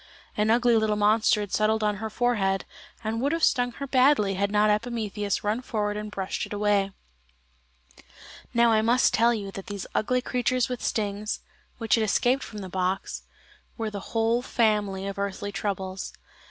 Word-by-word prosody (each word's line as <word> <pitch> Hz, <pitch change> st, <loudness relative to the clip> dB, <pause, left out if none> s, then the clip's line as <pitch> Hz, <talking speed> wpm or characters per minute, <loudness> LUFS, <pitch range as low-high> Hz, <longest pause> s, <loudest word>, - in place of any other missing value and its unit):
An 210 Hz, +1 st, +1 dB
ugly 240 Hz, +1 st, +4 dB
little 220 Hz, -1 st, +1 dB
monster 210 Hz, +1 st, +3 dB
had 205 Hz, -2 st, -6 dB
settled 215 Hz, +1 st, +2 dB
on 210 Hz, -1 st, +1 dB
her 220 Hz, +2 st, -4 dB
forehead, 210 Hz, -5 st, 0 dB, 0.4 s
and 225 Hz, +1 st, -2 dB
would 280 Hz, +2 st, +1 dB
have 330 Hz, -1 st, -2 dB
stung 245 Hz, -2 st, +3 dB
her 280 Hz, -, -6 dB
badly 255 Hz, -6 st, +3 dB
had 200 Hz, +1 st, 0 dB
not 210 Hz, +1 st, +3 dB
Epimetheus 210 Hz, -2 st, -2 dB
run 210 Hz, +4 st, 0 dB
forward 210 Hz, -4 st, -2 dB
and 210 Hz, 0 st, -5 dB
brushed 195 Hz, -2 st, -3 dB
it -, -, -8 dB
away. 205 Hz, -1 st, +1 dB, 1.6 s
Now 235 Hz, 0 st, +4 dB
I 215 Hz, -1 st, +4 dB
must 240 Hz, +3 st, +3 dB
tell 230 Hz, +2 st, +4 dB
you 205 Hz, -4 st, -3 dB
that 195 Hz, +2 st, -8 dB
these 205 Hz, -3 st, -5 dB
ugly 250 Hz, +3 st, +1 dB
creatures 250 Hz, -1 st, 0 dB
with 250 Hz, -1 st, -5 dB
stings, 210 Hz, 0 st, -2 dB, 0.4 s
which 225 Hz, -2 st, -1 dB
had 225 Hz, -, +4 dB
escaped 245 Hz, +5 st, +2 dB
from 210 Hz, -4 st, -7 dB
the 190 Hz, -, -6 dB
box, 185 Hz, +1 st, -2 dB, 0.5 s
were 225 Hz, -2 st, -3 dB
the 205 Hz, -, -5 dB, 0.2 s
whole 225 Hz, +2 st, +2 dB
family 210 Hz, -6 st, 0 dB
of 200 Hz, 0 st, -5 dB
earthly 200 Hz, 0 st, -3 dB
troubles. 195 Hz, -1 st, -4 dB
215 Hz, 175 wpm, -26 LUFS, 200-235 Hz, 1.6 s, ugly